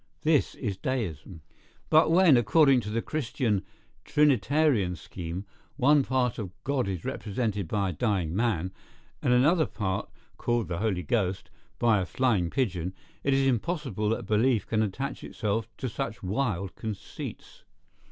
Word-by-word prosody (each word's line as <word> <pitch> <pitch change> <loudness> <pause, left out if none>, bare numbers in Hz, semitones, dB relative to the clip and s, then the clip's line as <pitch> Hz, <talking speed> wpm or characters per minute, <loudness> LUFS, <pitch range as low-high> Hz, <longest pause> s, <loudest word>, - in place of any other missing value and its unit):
This 155 -2 +2
is 100 -7 -3
deism. 95 - -4 0.5
But 155 +1 +6
when, 170 -3 +6
according 135 +3 +5
to 105 - -6
the 115 +2 -1
Christian 120 -8 -1 0.4
Trinitarian 135 - +3
scheme, 85 +3 -6 0.3
one 145 +2 +4
part 125 -2 0
of 100 -4 -4
God 135 -5 0
is 95 -4 -4
represented 105 -3 -2
by 100 +1 0
a - - -3
dying 90 -5 0
man, 95 -5 0 0.5
and - - +1
another 150 +5 +4
part, 95 -3 -3 0.3
called 120 -3 0
the 85 -2 -2
Holy 100 -5 0
Ghost, 100 -5 -1 0.3
by 115 -3 +3
a 90 - -3
flying 110 -10 +1
pigeon, 95 -8 -1 0.3
it 135 -1 +2
is 135 0 +2
impossible 130 - 0
that 115 +1 -1
belief 110 +1 +2
can 110 -1 0
attach 120 +7 -3
itself 110 0 -2
to 130 - -3
such 120 -1 -4
wild 100 -2 -1
conceits. 110 -3 -7
115 Hz, 145 wpm, -28 LUFS, 95-135 Hz, 0.5 s, But